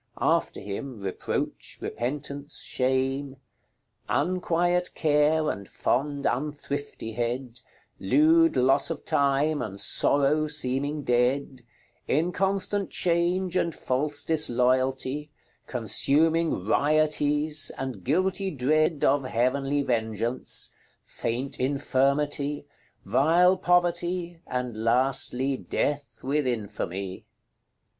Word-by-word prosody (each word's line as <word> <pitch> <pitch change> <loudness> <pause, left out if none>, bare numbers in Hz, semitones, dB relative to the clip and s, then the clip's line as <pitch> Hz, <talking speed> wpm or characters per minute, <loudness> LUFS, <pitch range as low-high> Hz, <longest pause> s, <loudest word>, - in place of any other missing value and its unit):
After - - +1
him, 105 +4 -6
Reproach, 95 -1 -4
Repentance, 140 +3 -4
Shame, 130 +1 -1 0.7
"Unquiet 175 +2 0
Care, 155 0 +2
and 100 -1 -8
fond 140 +2 -1
Unthriftyhead, 125 -4 -3 0.4
Lewd 155 +10 +4
Losse 130 +1 +3
of 165 -3 -5
Time, 140 +2 +1
and 100 -2 -6
Sorrow 145 +8 +2
seeming 145 0 +1
dead, 125 +2 0 0.5
Inconstant 195 +5 0
Chaunge, 175 +1 +1
and 170 -3 0
false 145 +3 -1
Disloyalty, 130 0 +1 0.4
Consuming 150 +8 +2 0.2
Riotise, 150 +2 +2
and 130 -8 -5
guilty 185 +6 0
Dread 155 +1 +1
Of 140 -1 +2
heavenly 135 +4 0
vengeaunce; 115 0 -1 0.3
faint 125 +4 -4
Infirmity, 140 +2 0 0.4
Vile 175 +6 +4
Poverty, 175 -1 0
and 125 -3 -3
lastly 130 +2 +1
Death 145 +2 -3
with 140 +1 0
infamy." 100 -5 -4
140 Hz, 85 wpm, -26 LUFS, 125-155 Hz, 0.7 s, Lewd